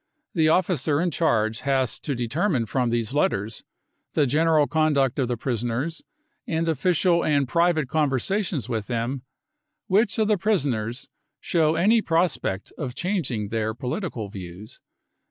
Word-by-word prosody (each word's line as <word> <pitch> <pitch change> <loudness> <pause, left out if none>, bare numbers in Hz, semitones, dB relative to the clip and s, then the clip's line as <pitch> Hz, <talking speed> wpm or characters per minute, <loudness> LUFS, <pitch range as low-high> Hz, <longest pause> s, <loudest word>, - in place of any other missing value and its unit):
The 160 -3 +3
officer 160 -4 +2
in 175 +1 +1
charge 110 -9 +1
has 135 -3 0
to 140 - -3
determine 125 - 0
from 125 +2 0
these 115 +1 -1
letters, 110 -6 0 0.5
the 150 - +3
general 155 +2 +3
conduct 145 -4 +1
of 130 - +1
the 120 -1 -2
prisoners, 120 +6 -2 0.5
and 165 0 -1
official 170 +2 +2
and 145 -3 +2
private 170 -2 +2
con 150 +1 +1
versations 165 - -1
with 110 -3 -3
them, 120 +2 -2 0.6
which 205 +2 +2
of 220 -1 +2
the 210 -3 +2
prisoners 135 - -1 0.3
shows 160 -2 +1
any 215 +6 +4
prospect 165 - 0
of 130 -4 -4
changing 135 - -2
their 110 0 -1
political 125 - -4
views. 95 +1 -9
145 Hz, 140 wpm, -24 LUFS, 120-170 Hz, 0.6 s, any